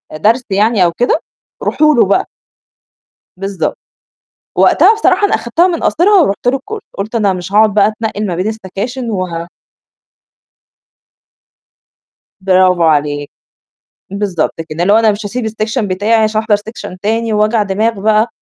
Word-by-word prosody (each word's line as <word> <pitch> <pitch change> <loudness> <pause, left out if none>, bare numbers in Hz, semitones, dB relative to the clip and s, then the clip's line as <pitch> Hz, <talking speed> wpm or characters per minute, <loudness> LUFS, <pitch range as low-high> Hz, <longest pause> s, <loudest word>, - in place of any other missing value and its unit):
درس 225 +11 +2
يعني 205 +1 +2
أو 170 - +1
كده 245 +5 +1 0.4
روحوا 305 -1 +2
له 235 - +4
بقى.َ" 200 - +1 1.1
بالضبط. 195 0 -3 0.8
وقتها 445 - +5
بصراحة 435 -2 +2
أنا - - -1
أخدتها 235 +11 +1
من 335 -3 -2
قاصرها 385 +3 +3
ورُحت 200 -3 -2
له 260 +2 +3
الكورس. 420 +10 -8 0.2
قُلت 210 +4 -5
أنا 210 -4 +2
مش 185 +1 -6
هاقعد 215 -1 +4
بقى 205 0 +4
أتنقّل 215 -1 -4
ما 180 - -2
بين 180 +3 -2
السكاشن 220 +4 -5
وه 175 -4 -4 2.9
برافو 185 -2 +3
عليك. 145 -2 +1 0.8
بالضبط 195 -6 -2 0.2
كده، 155 +2 -4
اللي 200 - +3
هو 220 - +6
أنا 220 -2 +4
مش 205 +1 -6
هاسيب 240 +3 -3
السيكشن 220 +1 -2
بتاعي 205 +4 -1
عشان 215 -1 +2
أحضر 220 -2 +2
سيكشن 205 -3 -8
تاني 225 +2 -1
وجع 215 +1 +2
دماغ 210 +2 -1
بقى 215 +2 +2
215 Hz, 145 wpm, -14 LUFS, 190-230 Hz, 2.9 s, هو